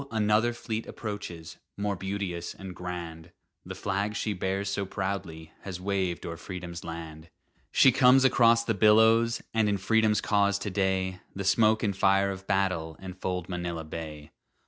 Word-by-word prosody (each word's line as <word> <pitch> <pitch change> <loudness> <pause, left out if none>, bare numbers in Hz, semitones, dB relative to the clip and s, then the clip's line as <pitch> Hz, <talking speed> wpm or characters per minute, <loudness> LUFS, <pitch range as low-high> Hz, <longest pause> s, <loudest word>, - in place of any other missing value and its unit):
another 110 +1 +2
fleet 115 -1 -5
approaches, 100 -7 -7 0.2
More 100 0 -1
beauteous 95 -2 -4
and 95 -2 -9
grand; 85 -3 -6 0.3
The - - -7
flag 100 +1 -2
she 105 -1 -1
bears 95 +1 -2
so 100 0 -1
proudly 95 -5 -4
Has 95 -2 -6
waved 95 -3 -2
o'er 85 -1 -5
Freedom's 90 -1 -7
land! 80 -1 -8 0.4
She 135 - +6
comes 130 +1 +5
across 115 -2 +5
the 115 - 0
billows, 110 +3 +4
And 110 -2 +2
in 100 - +1
Freedom's 105 +1 +2
cause 100 -1 +2
to 100 0 -4
day 95 -1 0 0.2
The 100 - -3
smoke 110 +3 +3
and 100 -3 0
fire 95 0 +3
of 95 0 -8
battle 90 -5 0
Enfold 90 -1 -4
Manila 85 -2 -4
Bay. 80 -1 -8
95 Hz, 155 wpm, -28 LUFS, 90-105 Hz, 0.4 s, She